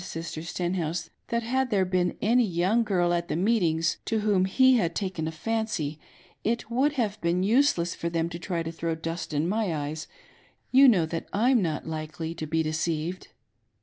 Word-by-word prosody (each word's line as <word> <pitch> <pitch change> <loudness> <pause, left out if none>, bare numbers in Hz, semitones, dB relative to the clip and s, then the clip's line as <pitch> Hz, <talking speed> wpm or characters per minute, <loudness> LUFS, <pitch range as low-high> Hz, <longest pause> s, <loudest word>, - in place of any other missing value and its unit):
Sister 165 -2 -5
StenhouSe, 175 -1 -3 0.2
that 235 0 -1
had 260 +3 0
there 195 -4 +2
been 180 -1 0
any 240 +4 +4
young 190 +3 +2
girl 180 -5 +1
at 170 0 -1
the - - -2
meetings, 170 -4 +1
to 220 -1 0
whom 200 -3 +2
he 260 +6 +5
had 170 -6 0
taken 185 -6 -2
a - - -2
fancy, 165 -5 -2 0.4
it 230 0 -1
would 275 +5 +2
have 215 -6 -2
been 170 +2 +1
useless 210 -6 +3
for 170 - -3
them 165 -1 0
to 170 0 -7
try 170 -1 -2
to 165 - -4
throw 165 0 -2
dust 165 +1 -5
in 150 +2 0
my 210 0 0
eyes 150 +1 -4 0.3
— - - -34
you 270 +2 +8
know 190 -10 +5
that 165 +1 -5 0.2
/';« - - +4
not 155 -3 -2
likely 160 +1 -5
to 160 -2 -6
be 160 +1 +1
deceived.'" 160 +2 -2
175 Hz, 190 wpm, -27 LUFS, 165-215 Hz, 0.4 s, you